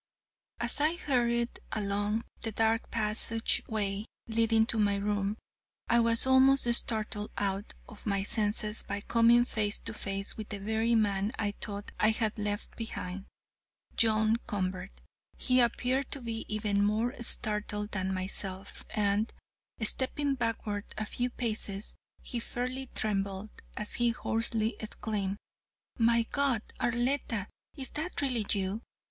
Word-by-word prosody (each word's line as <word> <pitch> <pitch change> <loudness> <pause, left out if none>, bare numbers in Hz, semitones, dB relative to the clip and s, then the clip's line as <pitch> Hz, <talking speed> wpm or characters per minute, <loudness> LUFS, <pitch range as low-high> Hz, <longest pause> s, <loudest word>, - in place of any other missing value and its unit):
"'As - - +2
I 310 +3 +4
hurried 240 -6 0
along 205 +1 0 0.2
the 225 - -2
dark 225 +1 +1
passageway 215 -2 +1 0.2
leading 225 -1 +3
to 225 -1 0
my 205 -1 +3
room, 200 +1 -1 0.5
I 235 - +5
was 230 +1 +5
almost 260 -1 +5
startled 215 -2 0
out 200 +1 -2
of 220 -2 -11
my 200 -1 +1
senses 210 +1 +1
by 200 - -4
coming 235 +2 +5
face 210 -3 +1
to 225 - -2
face 195 -1 -2
with 215 -1 -6
the 205 - -3
very 220 +3 +1
man 205 0 +1
I 205 -2 0
thought 205 0 -4
I 215 - +5
had 220 -1 0
left 205 0 -3
behind, 195 -4 -5 0.7
John 220 -1 +3
Convert. 185 -1 -3 0.4
He 255 -1 +3
appeared 250 +3 +2
to 280 - -1
be 225 -1 -4
even 210 -1 +1
more 220 +4 +1
startled 210 -2 +1
than 190 -1 -1
myself, 190 +1 -3
and, 210 +1 +1 0.5
stepping 275 +5 +3
backward 225 -4 -2
a 215 - -2
few 245 +3 -1
paces, 215 -4 -1 0.3
he 245 - -2
fairly 255 +3 -4
trembled, 200 -1 -1 0.3
as 210 - -1
he 240 0 +3
hoarsely 225 -1 0
exclaimed: 205 -2 -2 0.6
'My 230 0 +4
God, 265 -2 0 0.2
Arletta, 240 -3 0 0.3
is 265 -2 -4
that 320 +4 -3
really 250 -7 +1
you?' 200 +2 0
220 Hz, 135 wpm, -30 LUFS, 205-235 Hz, 0.7 s, I